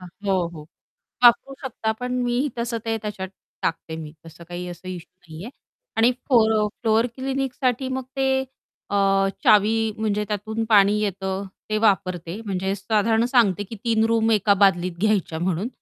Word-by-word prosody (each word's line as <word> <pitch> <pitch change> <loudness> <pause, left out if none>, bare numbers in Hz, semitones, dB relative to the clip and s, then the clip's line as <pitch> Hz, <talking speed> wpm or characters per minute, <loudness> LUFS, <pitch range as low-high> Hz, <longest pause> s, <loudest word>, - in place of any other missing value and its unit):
हं, 180 - -10 0.2
हो, 185 -3 +2
हो. 155 -3 -11 0.6
वापरू 240 +3 +5
शकता, 225 -4 -2
पण 250 +3 -5
मीही 245 +4 0
तसं 235 0 -2
ते 225 0 0
त्याच्यात 205 -3 -5 0.3
टाकते. 160 0 -3
मी 155 -2 -8
तसं 165 +1 -12
काही 175 +1 -5
असं 175 +1 -10
इश्यू 180 0 -8
नाही 155 +3 -8
आहे. 235 - -8 0.5
आणि 230 +2 +5 0.2
फोर 225 -4 +5 0.3
फ्लोअर 225 0 +3
क्लीनिंगसाठी 265 -1 -1
मग 260 0 -3
ते 270 0 +1 0.6
अ, - - -1 0.5
चावी 210 +1 +5 0.3
म्हणजे 210 -1 0
त्यातून 215 +2 -3
पाणी 205 -1 +5
येतं 195 -1 -2 0.2
ते 215 - +1
वापरते 185 -4 +1
म्हणजे 190 -1 -1
साधारण 220 +3 +1
सांगते 230 -6 +3
की 205 +3 -9
3 225 -2 +2
रूम 225 0 +2
एका 210 -1 +4
बादलीत 185 -3 +2
घ्यायच्या 200 -6 +1
म्हणून. 180 +4 -1
210 Hz, 160 wpm, -23 LUFS, 185-230 Hz, 0.6 s, वापरू